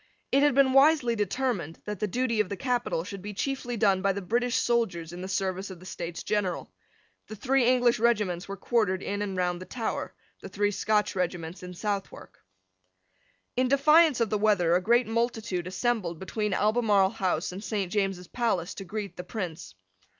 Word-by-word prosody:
It 275 - +4
had 290 -2 +4
been 270 -1 +4
wisely 270 -4 +5
determined 205 - -2
that 210 -2 -5
the 210 - 0
duty 235 +2 0
of 210 - +1
the 200 - -4
capital 245 -9 -1
should 195 +1 -7
be 205 +1 -7
chiefly 250 0 -2
done 195 -3 +3
by 195 +1 +2
the 200 - -4
British 240 +5 0
soldiers 185 -9 0
in 175 - -7
the 185 - -5
service 190 0 -2
of 185 -3 -9
the 185 - -14
States 170 -2 -6
General. 205 -4 -2 0.6
The 215 - -7
three 260 +4 +2
English 245 -2 +3
regiments 210 -6 +1
were 200 0 -6
quartered 200 -3 0
in 205 +1 -3
and 195 -2 -3
round 180 -1 0
the 185 - -9
Tower, 230 -3 -4 0.3
the 195 - -8
three 205 +1 0
Scotch 210 0 0
regiments 175 -1 -3
in 180 0 -8
Southwark. 200 +1 -5 1.2
In 255 +1 +2
defiance 300 +1 +5
of 230 -2 0
the 210 - +1
weather 200 -6 +3
a 180 - +2
great 235 +5 +3
multitude 225 -5 -1
assembled 190 -4 -1
between 210 +4 -3
Albemarle 210 -3 +3
House 180 -3 -1
and 190 +3 -7
Saint 195 -3 -2
James's 195 -3 -1
Palace 200 -8 -1
to 195 - -7
greet 205 +2 -6
the 180 - -5
Prince. 165 - -6
205 Hz, 185 wpm, -28 LUFS, 185-235 Hz, 1.2 s, wisely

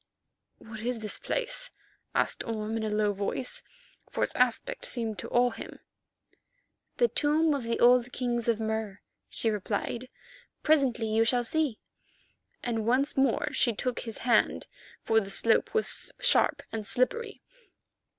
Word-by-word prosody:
"What 220 -1 -10
is 240 +2 -2
this 215 -2 -5
place?" - - -2 0.5
asked - - +1
Orme 220 -1 -3
in 220 - -2
a 215 - -1
low 210 -1 +1
voice, 200 +6 -2 0.5
for - - -1
its - - 0
aspect 250 -2 0
seemed 225 -5 -1
to - - -6
awe 245 0 +3
him. - - -9 1.2
"The 480 - +4
tomb 310 -3 +2
of 280 - -1
the 230 0 -2
old 245 0 +5
kings 240 -2 -2
of 230 -2 +2
Mur," 220 -2 -3 0.3
she 225 - 0
replied. 215 +4 -3 0.5
"Presently 270 -7 +3
you 220 +1 +2
shall 245 +1 +2
see," 290 -2 0 0.9
and 225 -2 -2
once 265 +4 +2
more 270 +2 +1
she 240 -5 +2
took 250 +3 -2
his 225 -2 -5
hand, 240 -2 +3 0.4
for 225 - +3
the 195 -2 -5
slope 225 +3 +3
was 445 - +1
sharp - - +3
and 215 -2 -4
slippery. 420 - -1
235 Hz, 150 wpm, -29 LUFS, 220-260 Hz, 1.2 s, old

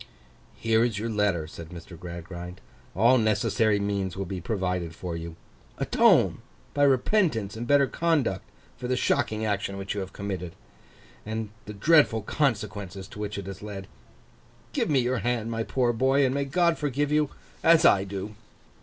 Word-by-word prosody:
'Here 115 0 +2
is 120 -4 0
your 115 +2 -2
letter,' 100 -7 +1
said 80 0 -10
Mr. 85 0 -10
Gradgrind. 85 +1 -8 0.4
'All 120 +7 +5
necessary 110 -1 +2
means 100 -2 -2
will 95 - -2
be 95 0 -5
provided 90 -4 -2
for 85 -1 -5
you. 85 0 -6 0.4
Atone, - - +4 0.3
by 145 - 0
repentance 135 - +2
and 120 +2 -5
better 145 0 +5
conduct, 145 - 0 0.3
for 125 0 -5
the 130 0 0
shocking 110 -3 0
action 100 -2 -1 0.2
you 105 - -3
have 95 -1 -5
committed, 95 -4 -5 0.7
and 110 -1 -4 0.2
the 105 - -6
dreadful 120 -1 +4
consequences 100 -8 -2
to - - -11
which 105 -1 -4
it 100 - -5
has 95 0 -8
led. 100 -2 -7 0.9
Give - - 0
me 145 - +3
your 125 0 +1
hand, 115 +1 -1
my 115 0 -2
poor 120 +1 +1
boy, 135 +4 +3
and 130 - +1
may 140 0 0
God 170 +4 +2
forgive 145 0 -1
you 150 -1 +2 0.3
as 165 0 +5
I 95 - +6
do! 100 +2 -5
105 Hz, 165 wpm, -27 LUFS, 95-130 Hz, 0.9 s, I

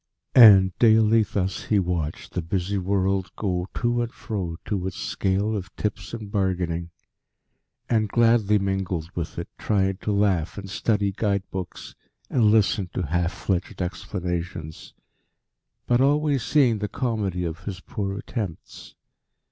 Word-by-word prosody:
And 95 -6 +8
daily 110 -1 +5
thus 95 -3 -2
he 105 - +2
watched 85 -5 -2
the 90 - -1
busy 95 +4 -1
world 95 -1 0
go 90 -3 -2
to 120 0 +1
and 120 -1 -3
fro 90 -6 -4
to 95 -3 -2
its 95 - -6
scale 100 +3 -1
of 95 -3 -6
tips 100 -4 -3
and 110 -4 -7
bargaining, 90 -4 -1 1.0
and 110 -3 +1
gladly 115 -2 +4
mingled 95 -4 -2
with 85 -2 -5
it, 85 - -4
trying 95 -3 +1
to 105 - -3
laugh 100 -5 +1
and 100 -1 -6
study 100 0 0
guidebooks, 95 -3 -3 0.4
and 120 -4 +3
listen 105 -3 +3
to 95 - -1
half 85 +3 0
fledged 90 -1 -3
explanations, 90 -3 -5 0.9
but 120 +1 +3
always 145 0 +2
seeing 125 -7 +3
the 105 - -2
comedy 105 -8 -2
of 85 -1 -5
his 95 -3 -5
poor 100 +1 -4
attempts. 100 -6 -6
95 Hz, 140 wpm, -24 LUFS, 90-110 Hz, 1.0 s, And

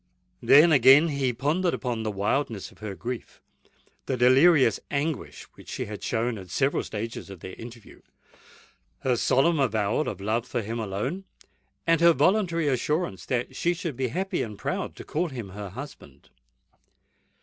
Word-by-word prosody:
Then, 155 +4 +7
again, 140 +3 +7
he 140 -3 0
pondered 155 +9 0
upon 120 -4 -3
the 110 - -2
wildness 105 +2 -2
of - - -21
her 105 -2 -6
grief—the 125 +2 -8
delirious 130 0 +5
anguish 145 +1 -3
which - - -15
she - - -4
had 105 -1 -8
shown 115 -1 -1
at 95 -1 -11
several 135 +10 +1
stages 110 0 -6
of 95 -4 -10
their 95 - -8
interview—her 120 +2 -9
solemn 145 +7 +2
avowal 115 +1 +1
of 100 - -7
love 110 +5 -1
for 120 -2 -2
him 115 +3 -4
alone—and 150 - -4
her 170 0 +7
voluntary 170 +1 +2
assurance 140 - -1
that 125 -2 -2
she 175 +1 0
should 165 -5 -4
be 130 +1 -1
happy 190 +9 -2
and 105 -3 -5
proud - - -3
to - - -9
call 170 +3 -2
him 120 -8 -7
her 100 +1 -7
husband. 115 - -11
125 Hz, 150 wpm, -26 LUFS, 110-150 Hz, -, Then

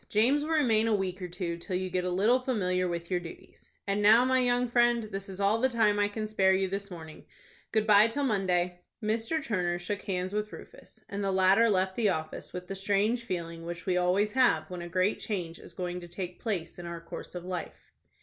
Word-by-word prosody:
James 245 +8 +3
will 305 - -4
remain 235 -9 +3
a 220 - +3
week 190 -1 -3
or 180 - -3
two, 175 -1 -4
till 180 +2 -4
you 185 +1 -1
get 180 0 -1
a 180 - -1
little 210 +8 +3
familiar 185 -8 0
with 170 0 -4
your 180 - +2
duties. 170 -2 -12 0.2
And 200 +1 0
now, 220 +4 +7
my 260 0 +3
young 245 0 +2
friend, 240 -1 +3
this 195 -2 -6
is 190 0 -8
all 200 +3 +2
the 260 - +3
time 215 -4 +2
I 205 - +3
can 215 +1 -4
spare 190 -3 +3
you 190 0 +1
this 200 +1 -4
morning. 160 -3 -10 0.5
Good 220 -1 +2
by 210 0 +7
till 285 +5 -2
Monday." 180 -6 0 0.2
Mr. 225 +9 0
Turner 180 -5 0
shook 200 +4 -4
hands 185 0 -3
with 210 0 -2
Rufus, - - -13
and 200 0 -4
the 195 - +1
latter 190 +4 +4
left 190 -1 +1
the 220 -3 +2
office 160 -4 -4
with 180 0 -7
the - - -4
strange 205 +4 0
feeling 170 -4 -4
which 170 0 -6
we 185 - +1
always 180 +4 +2
have 255 -5 +2
when 180 -1 -5
a 175 - -7
great 185 +4 +1
change 175 -6 -4
is - - -13
going 180 -1 -3
to 175 - -10
take 180 +1 -6
place 180 -7 -3
in 175 - -7
our 170 0 -5
course 165 +2 -9
of 175 0 -6
life. 180 -3 -6
195 Hz, 230 wpm, -29 LUFS, 180-220 Hz, 0.5 s, now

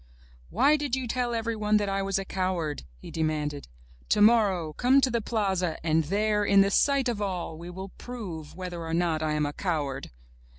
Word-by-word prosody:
"Why 295 +2 +4
did 285 -4 -1
you 260 -2 -3
tell 240 0 -1
everyone 215 -2 +1
that 205 -1 0
I 195 0 0
was 195 0 0
a 195 - -3
coward?'' 180 - -2
he - - -11
demanded. 150 -3 -2 0.4
''Tomorrow 205 -7 +4
come 255 +3 +4
to 265 -2 +2
the 235 0 0
plaza 190 -6 -1
and 160 -1 +2
there, 210 +4 +1
in 200 -1 +5
the 200 0 +3
sight 275 +3 +3
of 230 -4 -2
all, 180 -5 -3
we 170 +2 -9
will 190 +2 -7
prove 185 -11 -8
whether 180 -2 -6
or 165 0 -2
not 165 -2 +1
I 155 -1 0
am 150 0 +1
a 145 - -3
coward!" 145 -8 -2
195 Hz, 195 wpm, -27 LUFS, 160-220 Hz, 0.4 s, in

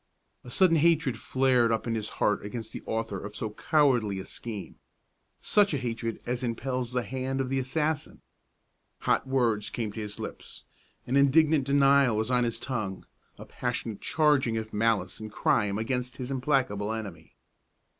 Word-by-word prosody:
A 125 - -11
sudden 165 +4 +4
hatred 160 -5 +3
flared 130 -3 +2
up 115 - 0
in 115 - -1
his 110 -2 -2
heart 105 - +1
against 110 +2 -6
the - - -6
author 110 -3 -3
of 105 +1 -7
so 110 -1 -3
cowardly 125 -6 +2
a 95 - -6
scheme, 110 -5 -7 0.6
such 205 -6 +3
a - - 0
hatred 115 -2 -3
as 125 +1 -2
impels 125 0 -2
the 125 -1 0
hand 130 +2 -3
of 130 -1 -1
the 135 0 0
assassin. 150 +3 -2 0.8
Hot - - +1
words 120 -6 +1
came 110 -3 -3
to 110 - -6
his 105 -1 -5
lips; - - -8 0.4
an 130 - +1
indignant 145 +1 +4
denial 140 -4 +4
was 110 +3 -1
on 125 -1 +3
his 115 -1 -2
tongue, 110 -8 -4 0.3
a - - -10
passionate 120 -4 -4
charging 145 -6 +2
of 110 0 -5
malice 110 0 +1
and 110 -1 -7
crime 105 -2 +1
against 125 +3 -2
his 130 0 -5
implacable 125 -6 0
enemy. 105 -6 -7
125 Hz, 165 wpm, -28 LUFS, 110-135 Hz, 0.8 s, sudden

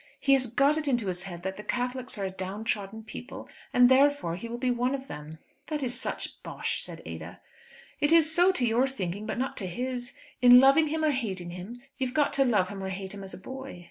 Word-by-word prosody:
He 275 -1 +4
has 260 -2 +3
got 280 +6 +3
it 310 -1 -2
into 240 -7 +1
his 180 -1 -3
head 175 -3 -8
that 190 0 -3
the 210 - -7
Catholics 250 +1 -3
are 200 - -2
a 190 - -3
downtrodden 200 +2 -4
people, 220 +4 -9 0.2
and 245 0 +6
therefore 265 -9 +3
he 200 +6 -6
will 235 - -4
be 250 0 0
one 245 +2 +1
of 270 0 -7
them." 150 - -8 0.3
"That 300 -2 -2
is 245 -1 -1
such - - -4
bosh," - - -3
said - - -7
Ada. - - -8 0.6
"It 290 - +2
is 320 -1 +5
so, 355 +3 +5
to 255 - +1
your 240 +3 +3
thinking, 205 -5 -4
but - - -3
not 260 +2 -2
to 190 - -3
his. 245 +6 -4 0.2
In 245 0 +9
loving 275 +4 +6
him 315 +1 -1
or 305 - +4
hating 195 -10 -3
him 200 +8 -8 0.2
you've 260 -1 -2
got 295 -2 +2
to 275 -1 +3
love 205 -7 +2
him 200 -1 -6
or 190 - -3
hate 190 +1 -5
him 200 -1 -8
as 190 - -8
a - - -10
boy. 265 +2 -8
245 Hz, 235 wpm, -28 LUFS, 195-270 Hz, 0.6 s, In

